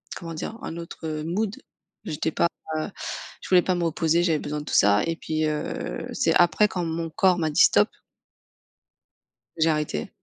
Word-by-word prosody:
comment 165 -1 -7
dire? 195 +8 -5
Un 165 - -5
autre 160 -2 -5
mood. 195 +5 -1 0.5
J'étais 155 +1 -2
pas 170 - +2 0.9
je - - -9
voulais 180 -1 +6
pas 185 +1 0
me 175 - -1
reposer, 165 +1 +2
j'avais 160 -4 +2
besoin 150 0 -4
de - - -10
tout - - -6
ça 100 +1 +5
et 165 - -1
puis 155 0 -1
heu, 150 - -3
c'est - - +2
après 175 +4 +5
quand 180 -3 -2
mon 165 0 -3
corps 190 0 +3
m'a 160 -2 0
dit: 150 - +3
«Stop - - +5 1.7
j'ai 160 - +4
arrêté». 150 - -1
165 Hz, 175 wpm, -25 LUFS, 155-175 Hz, 1.7 s, voulais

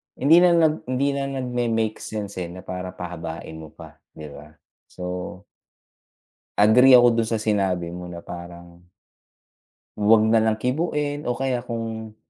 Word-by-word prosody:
hindi 150 +5 +5
na 175 -1 +5
nag 160 -2 +3
hindi 130 +2 0
na 140 - -2 0.2
nagme-make 115 -3 -1
sense, 105 -2 -6
eh, 90 -2 -3
na 90 +1 -10
para 90 0 -6
pahabain 85 -2 -7
mo 80 -1 -11
pa, - - -14 0.2
'di 75 -1 -10
ba? 75 +2 -13 0.4
So 90 0 -6 1.2
agree 125 +6 +7
ako 120 0 +7
dun 115 - 0
sa 115 - -1
sinabi 95 -5 -1
mo 90 0 -8
na 85 -1 -9
parang, 85 0 -10 1.2
'wag 105 +1 +5
nalang 110 -1 +3
kibuin. 145 +2 -2
O 120 - -1
kaya 130 -2 -1
kung 115 -2 -6
110 Hz, 145 wpm, -23 LUFS, 90-125 Hz, 1.2 s, agree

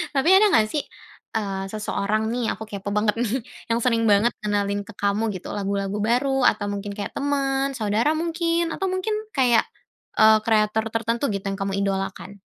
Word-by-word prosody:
Tapi 275 +4 +2
ada 425 - +6
nggak 220 -11 +5
sih, 295 - +1 0.5
eee, 195 -3 -2
seseorang 215 0 -1
nih 245 0 -1
aku 220 - -8
kepo 200 -1 -5
banget 210 0 +2
nih, 225 -3 0 0.4
yang 230 0 +2
sering 230 -2 +2
banget 210 +4 +4
ngenalin 205 -1 0
ke 225 - -10
kamu 205 +2 +1
gitu 185 - -8
lagu-lagu 200 0 -2
baru 250 +4 +2 0.2
atau 205 - -3
mungkin 200 0 -5
kayak 205 - -4
teman, 275 -1 0
saudara 220 +5 +1
mungkin 335 0 0
atau 385 - -2
mungkin 375 +4 -1 0.2
kayak, 245 -3 +4 0.6
eee, 220 0 +7
kreator 220 -1 +2
tertentu 230 +2 -1
gitu 195 0 -4
yang 195 - -3
kamu 195 0 -1
idolakan? 195 0 -3
220 Hz, 170 wpm, -23 LUFS, 200-250 Hz, 0.6 s, eee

